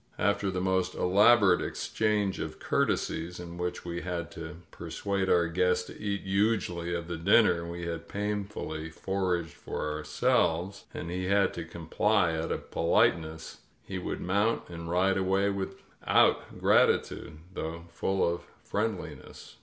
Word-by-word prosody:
After 100 -1 +1
the 95 -1 -2
most 95 0 +1
elaborate 100 0 +5
exchange 105 -3 0
of 80 0 -5
courtesies, 85 +2 -1
in 85 0 -8
which 90 0 -3
we 85 0 -4
had 85 -2 -4
to 80 +1 -7 0.2
persuade 95 +3 -2
our 85 -1 +4
guest 90 +1 +1
to - - -11
eat 100 -1 -2
hugely 95 -4 0
of 85 -1 -4
the 85 -1 -4
dinner 85 -1 +4
we 85 0 -5
had 85 -1 -5
painfully 100 -6 -3
foraged 90 -1 -1
for - - -5
ourselves, 80 +4 0
and 85 - -6
he 90 +1 -2
had 100 0 +3
to 85 - -5
comply 85 +3 +1
out 80 +1 -2
of - - -4
politeness, 80 -1 +1 0.2
he 95 - -5
would - - -4
mount 100 +5 +1
and 85 -1 -7
ride 95 +2 +2
away 95 +1 +2
without 100 -1 0
grati - - +4
tude, - - -9 0.2
though 85 0 -5
full 95 +2 +1
of 85 0 -1 0.2
friendliness. 105 -2 -4
90 Hz, 145 wpm, -29 LUFS, 85-100 Hz, 0.2 s, elaborate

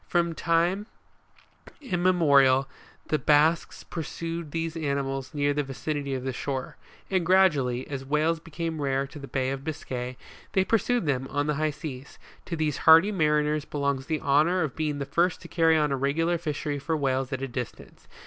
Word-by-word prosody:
From 170 -1 +1
time 170 +5 +1 0.9
immemorial 160 - +3 0.4
the 155 - +1
Basques 155 +3 +2
pur 165 - -5
sued 165 +1 -5
these 165 +1 -3
animals 140 -3 -2
near 145 -1 +1
the 145 - 0
vicinity 140 0 -3
of 130 - -4
the 130 0 -2
shore; 130 +1 -4 0.4
and 185 -2 +2
gradually, 150 -9 +3
as 135 -2 -5
whales 155 +4 +1
became 165 -1 -5
rare 135 -1 +1
in 150 - -9
the 140 - -8
Bay 130 -1 -1
of 135 0 -5
Biscay, 130 -5 -5 0.4
they 190 -1 +3
pursued 230 0 +1
them 135 -2 0
on 145 +1 -1
the 150 - 0
high 155 +1 0
seas: 140 -3 -8 0.3
to 170 - -3
these 155 -2 -1
hardy 165 +6 +7
mariners 150 -4 +1
belongs 140 -3 -2
the 155 -1 -1
honour 155 +6 +3
of 150 - -4
being 150 -2 -1
the 140 - -3
first 170 +6 +1
to - - -9
carry 165 -2 +3
on 150 -2 +1
a 135 - 0
regular 165 +6 0
fishery 150 -2 -3
for 160 +3 -1
whales 135 -2 -1
at. 130 0 -3
a - - -1
dis 125 -1 -4
tance. - - -18
150 Hz, 185 wpm, -27 LUFS, 135-165 Hz, 0.9 s, hardy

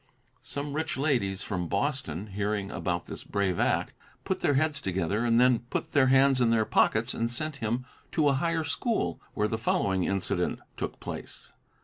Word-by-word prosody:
Some 140 0 -5
rich 160 0 -2
ladies 120 -9 0
from 90 -4 -2
Boston, 105 - -1
hearing 100 0 -1
about 85 -2 -2
his - - -8
brave 95 -3 0
act, - - +1 0.3
put - - -1
their 145 - +2
heads 145 0 +1
together 95 +2 0
and 115 -1 +4
then 125 -1 +5
put - - -3
their 135 -2 +4
hands 135 0 +5
in 120 - +4
their 115 -1 +3
pockets 110 +1 +2
and 115 +1 -1
sent 150 +4 -3
him 120 +1 -2 0.3
to 155 -2 +3
a 140 - +4
higher 165 +3 0
school, 225 - -1
where 105 - +2
the 110 +1 -2
following 95 -5 +1
incident 95 -2 -1 0.2
took - - -4
place. - - -8
115 Hz, 175 wpm, -28 LUFS, 100-140 Hz, 0.3 s, then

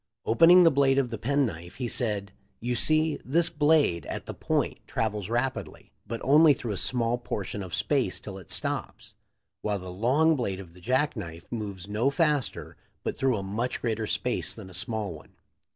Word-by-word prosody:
Opening 165 +10 +7
the 165 - +6
blade 135 -1 +3
of 130 -3 +1
the 115 - -4
pen 140 +6 +2
knife 85 -5 -7
he 125 - -3
said: 105 -4 0 0.3
"You 120 +1 -2
see, 155 +4 +3
this 165 +6 +2
blade 145 - +2
at - - -5
the - - -6
point - - -1
travels 105 -3 -2
rapidly, 120 +3 -3 0.2
but 115 - -4
only 150 +1 +6
through 120 -3 -5
a 100 - -2
small 120 +1 +1
portion 105 -3 -4
of 90 -3 -4
space - - 0
till - - -8
it - - -15
stops; - - -4 0.5
while 105 -1 -1
the 90 -1 -8
long 140 - +3
blade 100 -8 -2
of 90 -4 -11
the 90 - -16
jack 130 +9 +1
knife 85 -6 -7
moves 100 -5 -5
no 110 +6 +1
faster 150 -3 -1 0.3
but - - -2
through 130 -4 +1
a 100 - -4
much 110 +6 -2
greater 110 -2 -2
space 125 +3 -1
than 110 - -9
the - - -13
small 105 +1 -3
one. 75 - -14
115 Hz, 190 wpm, -27 LUFS, 100-140 Hz, 0.5 s, Opening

